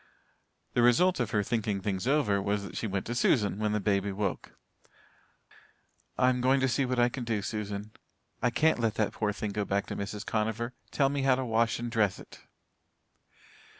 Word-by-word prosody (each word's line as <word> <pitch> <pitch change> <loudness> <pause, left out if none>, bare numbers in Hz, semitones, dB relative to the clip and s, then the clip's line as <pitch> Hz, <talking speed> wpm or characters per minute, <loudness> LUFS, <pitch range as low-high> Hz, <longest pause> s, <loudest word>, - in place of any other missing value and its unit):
The 120 - +2
result 130 +10 +4
of 120 -3 0
her 105 -1 +1
thinking 110 -2 -1
things 95 +2 -2
over 120 -9 +2
was 100 +1 -1
that 100 - -8
she 115 - -2
went 95 -1 -2
to 120 - -3
Susan 105 -4 +2
when 105 -1 0
the 105 - +1
baby 100 0 0
woke. 100 -1 -4 1.6
"I'm 125 -1 +3
going 130 +2 +3
to 135 - +3
see 135 +2 +1
what 125 0 -1
I 120 0 +5
can 125 +1 -5
do, 110 -4 -1
Susan. 105 0 -4 0.5
I 125 - +3
can't 155 +4 +2
let 115 -2 0
that 105 - 0
poor 105 - -1
little 105 - -5
thing 105 - -2
go 105 +1 -1
back 100 0 -1
to - - -5
Mrs. 100 +2 -5
Conover. 110 +3 -1 0.2
Tell 135 -2 +2
me 140 0 -1
how 135 -1 +4
to 130 0 -2
wash 115 0 +1
and 120 0 -4
dress 105 -4 +1
it." - - -13
110 Hz, 200 wpm, -29 LUFS, 100-125 Hz, 1.6 s, I